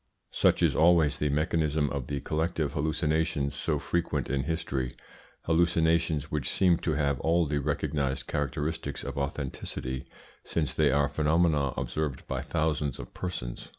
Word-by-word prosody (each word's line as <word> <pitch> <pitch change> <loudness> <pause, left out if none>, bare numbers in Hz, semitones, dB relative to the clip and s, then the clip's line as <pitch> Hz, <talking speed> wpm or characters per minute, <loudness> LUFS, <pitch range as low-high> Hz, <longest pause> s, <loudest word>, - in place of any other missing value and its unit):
Such - - +3
is - - +3
always 80 -4 +4
the 75 - +1
mechanism 75 0 +1
of 70 -4 -3
the 70 -1 -2
collective 80 -1 -1
hallucinations 75 -2 0
so 75 +2 0
frequent 75 0 -1
in 70 -1 0
history 70 -6 -2 0.5
hallucinations 80 -2 +2
which 75 -3 -1
seem 90 -3 +3
to 80 - -1
have 70 -2 +1
all 85 +1 +2
the 75 -1 0
recognised 70 -1 -1
characteristics 75 +1 -2
of - - -5
authenticity, 65 -2 -4 0.4
since 75 -6 -1
they 75 -1 +3
are 70 +1 +3
phenomena 75 -1 +2
observed 75 -4 -3
by - - -2
thousands 75 -4 -1
of - - -9
persons. 85 -10 -5
75 Hz, 145 wpm, -29 LUFS, 70-80 Hz, 0.5 s, always